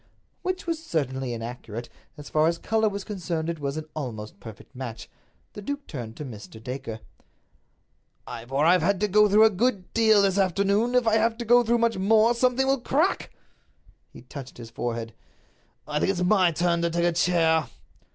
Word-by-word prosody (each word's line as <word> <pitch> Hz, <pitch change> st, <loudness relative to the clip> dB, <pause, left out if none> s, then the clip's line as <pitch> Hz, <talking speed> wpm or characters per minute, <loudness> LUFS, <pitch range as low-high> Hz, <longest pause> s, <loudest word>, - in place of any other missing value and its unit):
Which 370 Hz, 0 st, -3 dB
was 330 Hz, -2 st, -3 dB
certainly 135 Hz, -, -2 dB
inaccurate. 115 Hz, 0 st, -6 dB, 0.3 s
As 145 Hz, -1 st, -10 dB
far 155 Hz, +1 st, +2 dB
as 170 Hz, 0 st, 0 dB
color 220 Hz, +3 st, +1 dB
was 200 Hz, -1 st, -5 dB
concerned 170 Hz, -5 st, -3 dB
it 165 Hz, -, -7 dB
was 140 Hz, +1 st, -3 dB
an 155 Hz, -, -5 dB
almost 110 Hz, -8 st, -6 dB
perfect 110 Hz, +6 st, -12 dB
match. 120 Hz, -3 st, -7 dB, 0.5 s
The 210 Hz, -, -8 dB
duke 285 Hz, +6 st, -5 dB
turned 115 Hz, -6 st, -7 dB
to 150 Hz, -, -6 dB
Mr. 110 Hz, -2 st, -10 dB
Dacre. 120 Hz, -1 st, -6 dB, 1.2 s
"Ivor, 135 Hz, +6 st, -2 dB
I've 180 Hz, +2 st, +5 dB
had 190 Hz, +3 st, +1 dB
to 210 Hz, -, +2 dB
go 210 Hz, +1 st, +4 dB
through 215 Hz, +2 st, +6 dB
a 220 Hz, -, +5 dB
good 200 Hz, -2 st, -1 dB
deal 220 Hz, -3 st, +5 dB
this 195 Hz, 0 st, +2 dB
afternoon. 200 Hz, +5 st, +1 dB
If 250 Hz, -1 st, +3 dB
I 220 Hz, 0 st, +3 dB
have 225 Hz, +1 st, +1 dB
to 240 Hz, -, -5 dB
go 240 Hz, +2 st, +5 dB
through 235 Hz, +1 st, +2 dB
much 230 Hz, -3 st, +1 dB
more, 220 Hz, +4 st, +4 dB
something 255 Hz, +2 st, +2 dB
will 270 Hz, -1 st, +1 dB
crack!" 310 Hz, +10 st, 0 dB, 0.8 s
He -, -, -13 dB
touched 130 Hz, +1 st, -10 dB
his 115 Hz, -2 st, -10 dB
forehead. 115 Hz, -1 st, -4 dB, 0.7 s
"I 150 Hz, 0 st, -1 dB
think -, -, +1 dB
it's 180 Hz, -2 st, 0 dB
my 185 Hz, -2 st, +4 dB
turn 170 Hz, +1 st, +1 dB
to 170 Hz, -, +1 dB
take 170 Hz, +1 st, 0 dB
a 175 Hz, -, +3 dB
chair." 165 Hz, -2 st, +2 dB
175 Hz, 190 wpm, -25 LUFS, 135-220 Hz, 1.2 s, through